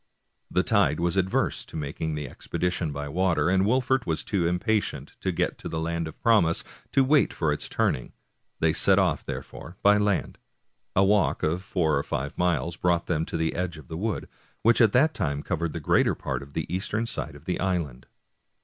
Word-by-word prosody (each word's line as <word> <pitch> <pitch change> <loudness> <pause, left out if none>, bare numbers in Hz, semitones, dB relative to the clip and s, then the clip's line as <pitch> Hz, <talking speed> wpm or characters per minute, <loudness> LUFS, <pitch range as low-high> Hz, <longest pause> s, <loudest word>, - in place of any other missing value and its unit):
The 90 - +2
tide 100 -10 +2
was 85 +1 0
adverse 95 -1 +1
to - - -13
making 75 +1 -3
the 75 -2 -4
expedition 90 +4 -2
by 75 0 -4
water, 85 -1 +1
and 95 +1 +3
Wolfert 130 +1 +1
was 80 -1 -1
too 90 -5 0
impatient 105 +5 -1
to - - 0
get - - -1
to - - -6
the 80 - -3
land 85 0 -2
of 80 - -10
promise 105 -8 +4 0.3
to 135 - +5
wait 145 +2 +4
for 80 -3 0
its - - -4
turning; 60 - 0 0.5
they 80 -1 +3
set - - +4
off, - - +2
therefore, 85 +3 -7
by 105 +1 +6
land. 105 -2 0 0.6
A 95 - +5
walk 100 0 +2
of 80 +4 0
four 80 -6 +1
or - - -2
five 70 +2 -3
miles 85 -1 0
brought 85 -1 +1
them 80 -2 0
to - - -3
the 80 0 0
edge 90 -2 -3
o 75 - -10
f 65 - -21
a - - -3
wood, 105 +3 -2 0.4
which 115 +1 +5
at 110 -3 +6
that 155 +5 +4
time 70 0 -2
covered 85 -3 -2
the - - -3
greater - - +2
part - - -3
of 70 +1 -12
the - - -2
eastern 100 +5 -2
side 115 - -5
of - - -14
the - - -2
island. 85 -9 -2
85 Hz, 205 wpm, -26 LUFS, 80-100 Hz, 0.6 s, by